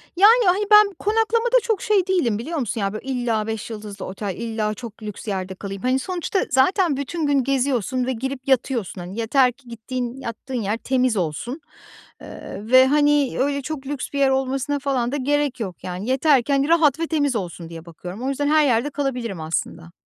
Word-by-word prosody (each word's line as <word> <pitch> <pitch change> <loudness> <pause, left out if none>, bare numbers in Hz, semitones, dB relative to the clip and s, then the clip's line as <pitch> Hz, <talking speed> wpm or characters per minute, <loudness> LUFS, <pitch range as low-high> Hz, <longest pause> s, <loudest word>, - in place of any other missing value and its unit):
Yani, 435 +5 +6
hani, 370 +3 +3
ben 420 -1 +7
konaklamada 450 +3 +1
çok 445 -5 0
şey 400 -3 +2
değilim 300 - +1
biliyor 315 +9 -4
musun? 230 -3 -2
Ya, 195 0 -1
böyle 215 - -7
illa 240 -4 -1
5 220 0 -4
yıldızlı 210 -3 -7
otel, 195 0 -5
illa 220 -2 -2
çok 225 0 -10
lüks 210 +1 -7
yerde 190 -2 -3
kalayım. 195 0 -7
Hani, 255 +1 +1
sonuçta 370 +3 -2
zaten 285 +3 +3
bütün 310 +4 -3
gün 280 -2 +2
geziyorsun 255 -2 0
ve 260 - -1
girip 265 +3 -5
yatıyorsun. 240 -7 0
Hani, 185 +5 -7
yeter 250 +3 +3
ki 250 +1 -25
gittiğin, 240 +2 -5
yattığın 240 +1 -5
yer 210 +2 -1
temiz 255 -2 +1
olsun, 195 - -3 0.6
ııı, 210 - -9
ve, 260 0 +8
hani, 290 -1 +3
öyle 280 +1 0
çok 275 -1 -6
lüks 285 -2 -4
bir 280 - -1
yer 275 -1 +4
olmasına 270 +2 0
falan 265 -3 -1
da - - -2
gerek 285 -1 0
yok. 190 -5 -6
Yani, 185 +6 -5
yatarken 275 0 +3
rahat 320 -3 +4
ve 330 - -1
temiz 290 -6 0
olsun 175 -4 -5
diye 165 0 -9
bakıyorum. 180 +7 -8
O 265 - -1
yüzden 285 +1 -1
her 310 0 +4
yerde 245 +1 +2
kalabilirim 250 - -3
aslında. 165 +1 -4
255 Hz, 190 wpm, -22 LUFS, 220-290 Hz, 0.6 s, ve